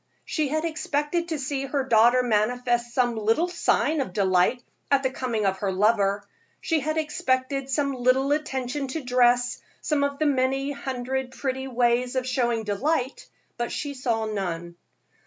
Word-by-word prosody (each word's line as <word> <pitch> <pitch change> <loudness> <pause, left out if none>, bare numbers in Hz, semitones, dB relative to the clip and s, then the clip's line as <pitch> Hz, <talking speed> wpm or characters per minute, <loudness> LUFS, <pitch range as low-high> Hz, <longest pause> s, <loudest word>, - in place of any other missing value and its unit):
She 310 -3 -1
had 310 +3 -1
expected 315 +1 -1
to 320 -2 -2
see 275 0 -3
her 275 0 -1
daughter 240 0 +4
manifest 240 +2 +1
some 240 -1 +1
little 225 +10 +1
sign 320 -3 +1
of 220 -9 -5
delight 190 +5 +2 0.3
at 275 -1 +3
the 260 - +1
coming 235 -5 -2
of 190 -1 0
her 195 -1 -1
lover; 200 0 +2 0.3
she 325 -2 0
had 310 +3 -2
expected 270 -3 -1
some 280 0 0
little 255 +2 +2
attention 275 -2 -1
to 285 +3 -4
dress, 245 0 +2 0.2
some 295 -2 0
of 280 0 -1
the 310 - 0
many 270 0 +1
hundred 265 -1 -3
pretty 265 0 -3
ways 245 0 +1
of 260 -1 0
showing 240 -3 0
delight, 255 +6 -1 0.3
but 240 - -2
she 285 -1 -3
saw 235 -4 -1
none. 175 -5 -4
255 Hz, 160 wpm, -25 LUFS, 235-280 Hz, 0.3 s, daughter